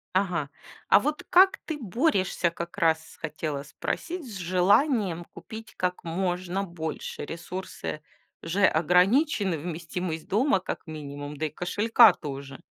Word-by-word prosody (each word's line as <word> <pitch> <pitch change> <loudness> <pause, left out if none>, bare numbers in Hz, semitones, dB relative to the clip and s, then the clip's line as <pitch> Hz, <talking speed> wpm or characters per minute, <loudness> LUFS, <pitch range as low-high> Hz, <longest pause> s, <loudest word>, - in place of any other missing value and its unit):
Ага. 175 -7 +1 0.4
А - - +8
вот 300 +6 -2
как 380 +2 +6
ты 315 - -3
борешься, 205 - +1
как 170 +2 -7
раз 160 -3 +1
хотела 150 -2 -3
спросить, 335 - -4
с 220 -5 -7
желанием 185 - +2
купить 220 +5 -10
как 180 0 -1
можно 180 +2 -2
больше. 160 -5 -5
Ресурсы 170 -1 -6 0.4
же 190 +4 +2
ограничены, 190 - +3
вместимость 165 +1 -4
дома 225 +2 +3
как 185 - -6
минимум, 145 -1 -7
да 155 +2 -1
и - - -6
кошелька 205 +5 +5
тоже. 140 -2 -7
180 Hz, 125 wpm, -27 LUFS, 160-205 Hz, 0.4 s, А